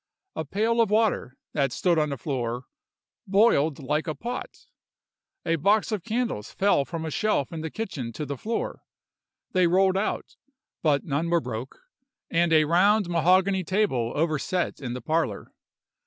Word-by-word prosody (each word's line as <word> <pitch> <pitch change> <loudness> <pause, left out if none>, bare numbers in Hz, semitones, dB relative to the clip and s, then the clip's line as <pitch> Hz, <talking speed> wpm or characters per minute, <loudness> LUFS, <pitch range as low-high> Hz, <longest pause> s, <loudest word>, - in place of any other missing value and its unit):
A - - -2
pail 225 +8 +1
of 225 - +2
water, 210 - +1 0.2
that 140 -3 +1
stood 170 +4 +2
on 150 -1 +1
the 140 - -3
floor, 125 -2 -3 0.6
boiled 190 -8 +3
like 150 +3 -2
a 155 - -2
pot! 245 +2 -6 0.8
A 165 -1 +1
box 205 +8 +2
of 210 -5 -2
candles 225 - -2
fell 195 -8 +2
from 165 0 -5
a 160 - -4
shelf 210 -6 0
in 160 - -4
the 160 - -4
kitchen 155 - -5
to 150 - -4
the 140 0 -4
floor; 225 - -3 0.7
they 185 -1 +3
rolled 190 +2 +3
out, 215 - -3 0.4
but 145 -3 +2
none 155 +3 -1
were 170 0 +3
broke: 125 -2 -6 0.5
and 170 0 +2
a 155 -1 +6
round 190 +4 +3
mahogany 185 +3 +3
table 170 - 0
overset 165 +3 -1
in 125 -4 -4
the 125 - -5
parlor. 155 -10 -1
165 Hz, 160 wpm, -26 LUFS, 140-200 Hz, 0.8 s, a